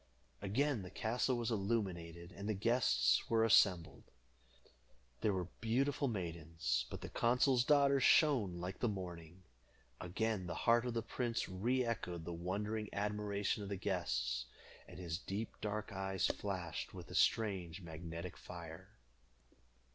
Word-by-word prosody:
Again 120 +5 +1
the 90 - -7
castle 120 +5 0
was 120 -1 -1
illuminated, 95 -6 -2
and 100 +3 -6
the 110 - +1
guests 115 +5 +3
were 115 -1 +4
assembled. 90 -6 +4 1.1
There 105 - +2
were 90 -3 -2
beautiful 135 +5 +1
maidens, 80 - -2
but - - -6
the - - -6
consul's 125 +1 +3
daughter 140 0 +5
shone 125 - +4
like 90 +2 -5
the 120 - +1
morning. 90 -2 -7 0.6
Again 100 +1 -1
the 85 - -3
heart 120 +1 +5
of 120 - -3
the 115 - 0
prince 120 0 -2
re 120 +8 0
echoed 90 -8 -3
the 85 - -4
wondering 105 +5 -2
admiration 105 0 -1
of 100 - -5
the 100 - -2
guests, 65 - -1 0.4
and - - -11
his 85 -2 -3
deep 100 +3 -5
dark 105 +1 -3
eyes 95 0 -1
flashed 90 -6 -3
with - - -9
a - - -7
strange 95 -5 +1
magnetic 85 +1 -6
fire. 85 +2 -10
100 Hz, 140 wpm, -37 LUFS, 85-115 Hz, 1.1 s, daughter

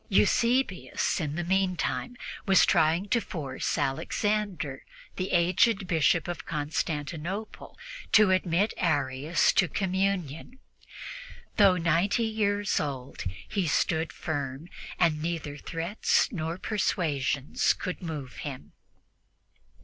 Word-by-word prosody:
Eusebius, 235 -2 +2
in 150 -2 -3
the 175 - -2
meantime, 190 +6 0 0.3
was 190 -2 +6
trying 165 +5 +3
to 235 +3 +2
force 140 -8 -3
Alexander, 165 +2 -1 0.3
the 185 0 -3
aged 185 +4 +3
Bishop 165 -1 +2
of 175 -2 -4
Constantinople, 155 +5 -4 0.3
to 215 -3 +6
admit 185 +2 +2
Arius 145 -1 +1
to 185 - +3
communion. 190 - -2 1.0
Although 195 -3 +6
ninety 175 +7 +2
years 205 -2 0
old, 135 -3 -5 0.2
he 190 -4 -1
stood 160 +1 +1
firm, 145 +1 -4 0.3
and 155 -4 +2
neither 160 -3 -3
threats 165 +7 0
nor 165 -4 -3
persuasions 145 - 0
could 180 - -5
move 150 -7 -6
him. 140 -4 -7
170 Hz, 105 wpm, -28 LUFS, 150-195 Hz, 1.0 s, was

